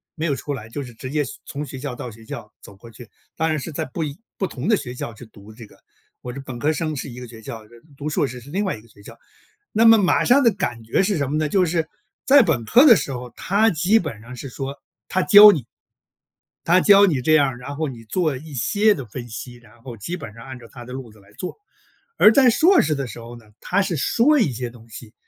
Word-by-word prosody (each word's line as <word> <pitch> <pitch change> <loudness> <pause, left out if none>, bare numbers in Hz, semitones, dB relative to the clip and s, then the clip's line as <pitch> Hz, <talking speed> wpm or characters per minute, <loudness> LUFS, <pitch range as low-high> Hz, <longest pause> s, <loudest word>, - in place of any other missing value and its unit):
没 160 - -3
有 150 - +1
出 145 - -5
来， 110 -5 -8
就 140 +5 -5
是 125 -2 -11
直 130 +3 -8
接 150 0 0 0.2
从 145 +1 -6
学 130 -1 -9
校 135 -2 -5
到 125 - -7
学 110 0 -15
校 - - -8
走 100 - -14
过 115 +4 -15
去。 115 0 -14 0.3
当 160 0 0
然 155 -1 0
是 160 - -7
在 - - -3
不 145 +5 -5
一 145 -1 -5 0.2
不 190 - -1
同 135 +1 -6
的 215 - +4
学 125 -7 -7
校 120 -2 -6
去 115 +3 -13
读 110 -1 -16
这 115 +1 -12
个， - - -21 0.4
我 125 - -6
是 140 - -7
本 130 -3 -8
科 145 +6 +1
生 155 0 -3
是 140 - -6
一 125 0 -9
个 125 - -9
学 115 -1 -13
校， 110 0 -9
这 120 - -18 0.2
读 150 +2 -4
硕 150 - 0
士 125 -2 -7
是 125 +3 -14
另 195 +5 -1
外 190 - -2
一 105 - -15
个 115 - -21
学 100 -1 -20
校， - - -13 0.5
那 220 - +3
么 225 0 +8
马 195 -4 +2
上 265 +3 +4
的 235 - +6
感 120 - -3
觉 115 +11 0
是 195 -1 0
什 140 -3 -2
么 150 - -1
呢？ 155 -1 -1
就 185 +2 +2
是 165 -1 -1 0.4
在 280 +1 +7
本 135 - 0
科 245 - +5
的 245 -7 +9
时 145 - -3
候， 125 -1 -6
他 210 +4 +1
基 185 +5 +2
本 145 - -6
上 120 +3 -11
是 135 - -8
说， 135 +2 -7 0.3
他 185 - 0
教 205 +2 +9
你， 145 - -3 1.0
他 175 +2 +4
教 200 +1 +6
你 150 -9 0
这 155 +5 +2
样， 140 -5 +3
然 135 +3 -8
后 155 +1 -2
你 120 -3 -10
做 155 +5 -1
一 155 +2 -12
些 205 - +2
的 140 -9 -7
分 120 +3 -8
析， 120 +3 -8
然 120 -1 -20
后 120 -2 -9
基 140 - -5
本 110 -11 -9
上 115 +1 -12
按 130 -1 -8
照 115 - -14
他 120 -2 -11
的 125 - -9
路 130 -3 -8
子 110 - -20
来 100 +1 -22
做。 180 - -7 0.6
而 215 - +7
在 255 -1 +5
硕 350 - +4
士 155 - 0
的 140 -3 -3
时 115 - -9
候 115 +1 -10
呢， 115 -2 -15
他 200 +2 0
是 190 -4 -2
说 275 - +3
一 205 - +2
些 120 +1 -4
东 115 -1 -16
西， 110 0 -11
140 Hz, 290 characters per minute, -21 LUFS, 120-175 Hz, 1.0 s, 的